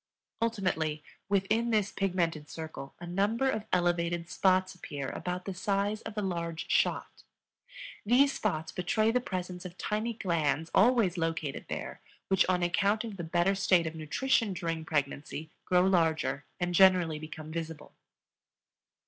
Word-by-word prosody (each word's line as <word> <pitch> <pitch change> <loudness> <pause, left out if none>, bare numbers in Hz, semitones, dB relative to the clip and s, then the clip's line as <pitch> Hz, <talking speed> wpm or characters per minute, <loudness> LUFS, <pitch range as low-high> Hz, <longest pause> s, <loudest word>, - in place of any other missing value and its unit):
Ultimately, 185 -9 0 0.3
within 210 +4 +2
this 210 -3 +1
pigmented 170 -6 -1
circle 160 -4 -7
a 175 - -7
number 205 +9 +1
of 215 -3 -3
elevated 175 -1 +1
spots 185 -1 +2
appear 145 -6 -6
about 180 0 -4
the 195 - -3
size 200 +3 -1
of 220 -1 -8
a 210 - 0
large 170 -3 -3
shot. - - +1 0.8
These 270 +6 +4
spots 160 -6 -2
betray 215 +5 +1
the 250 +1 +1
presence 180 -4 -5
of 180 0 -9
tiny 215 +3 -1
glands 165 -6 0
always 210 -5 +4
located 165 -3 -2
there - - -5 0.3
which, 190 -1 +4
on 180 -1 +2
account 200 +5 +2
of 220 -4 -6
the 170 - -4
better 175 +4 +2
state 190 -3 +3
of 160 - -3
nutrition 210 - 0
during 165 -2 -3
pregnancy, 145 +1 -2
grow 180 0 +4
larger, 165 -6 +1
and 175 0 -1
generally 180 -4 +5
become 155 0 -8
visible. 160 -2 -6
180 Hz, 145 wpm, -30 LUFS, 160-200 Hz, 0.8 s, generally